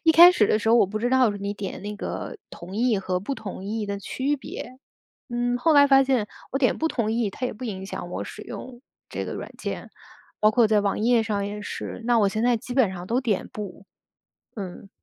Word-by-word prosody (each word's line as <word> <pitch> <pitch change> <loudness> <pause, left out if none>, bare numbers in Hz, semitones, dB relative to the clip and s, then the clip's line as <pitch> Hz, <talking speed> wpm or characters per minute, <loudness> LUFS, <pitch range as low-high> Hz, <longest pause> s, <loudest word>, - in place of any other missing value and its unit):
一 325 - +5
开 350 +2 +10
始 210 - +3
的 215 - +3
时 225 - -1
候， 230 - +6
我 235 - +6
不 215 +3 -3
知 240 +3 0
道 255 -3 +4
是 205 - -5
你 200 +1 -3
点 200 -2 -5
那 210 0 -4
个 - - -5
“同 180 +3 -9
意” 230 -2 +2
和 185 -1 -1
“不 275 - -3
同 195 -4 -7
意” 210 +1 -3
的 200 0 -2
区 275 +8 -1
别。 260 -1 -8 0.6
嗯， 245 0 0
后 320 +5 +3
来 285 0 +8
发 270 -1 +6
现 260 -5 +1 0.2
我 270 - -1
点 255 - +3
“不 320 - 0
同 225 -7 -1
意”， 225 -3 0
它 250 - -3
也 - - -4
不 225 +4 -12
影 195 -4 -5
响 - - -6
我 - - -3
使 - - -9
用 250 0 -9 0.3
这 - - -4
个 - - -5
软 - - -7
件， - - -5 0.5
包 215 - +6
括 225 +1 +4
在 210 -1 +3
网 200 -1 0
页 230 +1 +3
上 205 -2 -1
也 205 0 -5
是。 230 - -6
那 240 -1 +3
我 205 -2 +4
现 215 +3 -2
在 245 -1 +4
基 245 +3 -7
本 230 -8 +3
上 180 0 -7
都 240 +5 +1
点 220 -7 -1
“不”， 200 -2 -7 0.7
嗯。 195 -2 -7
220 Hz, 260 characters per minute, -25 LUFS, 200-250 Hz, 0.7 s, 开